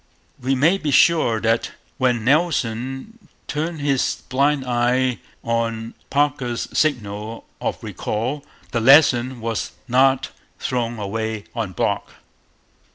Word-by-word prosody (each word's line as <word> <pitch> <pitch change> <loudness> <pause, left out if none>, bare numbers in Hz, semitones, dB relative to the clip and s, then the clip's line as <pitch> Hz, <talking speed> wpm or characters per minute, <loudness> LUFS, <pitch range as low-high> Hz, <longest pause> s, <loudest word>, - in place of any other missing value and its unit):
We 135 +2 +1
may 165 +9 +3
be 155 - -2
sure 145 -6 +4
that 115 +1 +1 0.3
when 125 -4 +1
Nelson 135 - -1 0.2
turned 155 +1 -3
his 140 -2 0
blind 140 +1 +2
eye 125 +1 +1 0.2
on 115 -1 -2 0.2
Parker's 135 -4 0
signal 110 -6 -1 0.2
of - - -3
recall 125 +7 -3 0.3
the 115 - 0
lesson 130 -2 +5
was 115 -1 -3
not 130 +1 +3 0.3
thrown 120 -2 -2
away 110 +1 -3
on 110 -6 -3
Brock. - - -1
125 Hz, 110 wpm, -21 LUFS, 115-140 Hz, 0.3 s, lesson